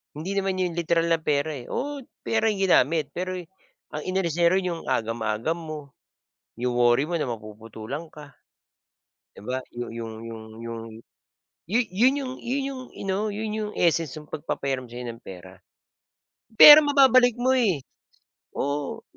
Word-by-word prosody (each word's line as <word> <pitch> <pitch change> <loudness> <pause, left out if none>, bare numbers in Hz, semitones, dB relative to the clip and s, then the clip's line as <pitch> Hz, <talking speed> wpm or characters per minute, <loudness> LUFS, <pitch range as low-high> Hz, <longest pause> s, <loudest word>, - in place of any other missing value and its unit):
Hindi 190 +6 -4
naman 195 -1 0
'yung 175 -2 -2
literal 170 0 +1
na 165 - +4
pera, 150 -1 0
eh, 120 - -9
oo, 290 +2 -3 0.2
pera 225 0 0
'yung 210 -3 +1
ginamit 155 -3 +3
pero, 185 +5 -4 0.6
ang - - -4
inalis 185 -3 -1
niya 170 +1 +4
run 190 -1 +1
'yung 165 -1 -4
agam-agam 115 +6 -1
mo. 155 -2 -6 0.8
'Yung 125 +1 -1
worry 120 +3 +3
mo 175 - -5
na 145 - -2
mapuputulan 110 +7 -7
ka. 145 -3 -13 1.0
'Di - - -12
ba 130 - -1 0.2
yu 120 0 -5
'yung 115 -1 -6 0.2
'yung 110 -1 -8 0.2
'yung. 115 -1 -6 0.9
'Yu 225 +5 +3
'yun 245 +8 +4
'yung 260 -2 -4
'yu 245 +2 -2
'yung 270 -2 -5 0.2
ano, 190 0 0
'yun 210 +1 -4
'yung 215 -1 -3
essence 165 -4 +1
'yung 150 - -10
pagpapahiram 135 -3 -3
sa'yo 120 +1 -7
ng 115 -1 -7
pera. 95 0 -12 0.9
Pera 295 +7 +12
mababalik 265 -5 +5
mo, 250 +2 +1
eh. 205 - +2 0.7
Oo, 140 0 -3
160 Hz, 155 wpm, -25 LUFS, 120-200 Hz, 1.0 s, Pera